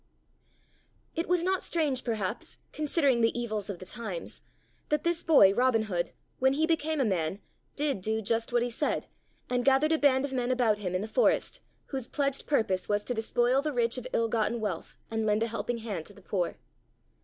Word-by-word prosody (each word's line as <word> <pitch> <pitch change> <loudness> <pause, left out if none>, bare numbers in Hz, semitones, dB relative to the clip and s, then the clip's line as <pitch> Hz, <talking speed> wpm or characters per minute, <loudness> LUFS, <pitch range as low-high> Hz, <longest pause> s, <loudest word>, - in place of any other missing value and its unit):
It 330 - -1
was 360 -1 +2
not 375 +1 +1
strange, 290 -6 0
perhaps, 215 -3 -3 0.2
considering 285 -5 +2
the 230 +1 +2
evils 215 -4 -3
of 200 - -4
the 185 - -10
times, 195 -6 -6 0.5
that 300 -1 +1
this 340 0 0
boy, 240 -12 +7
Robin 245 -1 +3
Hood, 175 -5 -2 0.3
when 265 +1 +4
he 310 +3 +2
became 315 -1 0
a 265 - +3
man, 185 -2 0 0.4
did 285 -8 -1
do 220 +3 0
just 225 +2 -1
what 240 0 +2
he 245 - -1
said, 290 +5 -1 0.4
and 245 0 0
gathered 275 +4 +4
a 320 - +3
band 270 -2 +4
of 275 - -6
men 250 -1 0
about 240 -5 +2
him 185 -3 -3
in 185 - 0
the 215 - -4
forest - - +1 0.3
whose 265 -4 -4
pledged 275 -2 -1
purpose 195 -10 +1
was 205 0 +1
to 245 - -2
despoil 240 +3 +2
the 300 +1 -2
rich 235 0 +1
of 250 - -7
ill 230 - +1
gotten 230 +1 0
wealth 200 -6 -4 0.2
and 220 -1 0
lend 210 +1 +2
a - - 0
helping 235 +1 -3
hand 210 -8 -5
to 205 - -14
the 200 - -16
poor. 180 -3 -2
235 Hz, 200 wpm, -29 LUFS, 210-275 Hz, 0.5 s, boy